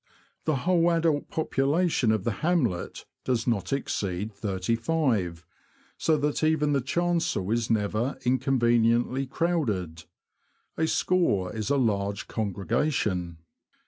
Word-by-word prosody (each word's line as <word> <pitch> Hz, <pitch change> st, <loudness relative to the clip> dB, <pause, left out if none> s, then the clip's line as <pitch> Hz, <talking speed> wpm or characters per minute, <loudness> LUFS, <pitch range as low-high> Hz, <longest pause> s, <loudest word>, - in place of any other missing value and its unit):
The 155 Hz, -, +2 dB
whole 175 Hz, -2 st, +4 dB
adult 165 Hz, -3 st, +1 dB
population 150 Hz, -3 st, +1 dB
of 110 Hz, -3 st, 0 dB
the 115 Hz, -, 0 dB
hamlet 145 Hz, -, 0 dB, 0.2 s
does 120 Hz, -3 st, 0 dB
not 100 Hz, -7 st, -1 dB
exceed 105 Hz, -6 st, -2 dB
thirty 100 Hz, +1 st, -1 dB
five, 115 Hz, -, 0 dB, 0.5 s
so 160 Hz, -1 st, +1 dB
that 150 Hz, +1 st, -1 dB
even 155 Hz, -2 st, +2 dB
the 140 Hz, -, +2 dB
chancel 165 Hz, -, 0 dB
is 115 Hz, -1 st, 0 dB
never 110 Hz, +4 st, 0 dB
inconveniently 120 Hz, 0 st, +2 dB
crowded: 115 Hz, -, -1 dB, 0.7 s
a 160 Hz, -, 0 dB
score 110 Hz, -, +1 dB
is 110 Hz, +1 st, -3 dB
a 140 Hz, -, +2 dB
large 100 Hz, -5 st, 0 dB
congregation. 100 Hz, -, -1 dB
120 Hz, 115 wpm, -27 LUFS, 100-155 Hz, 0.7 s, whole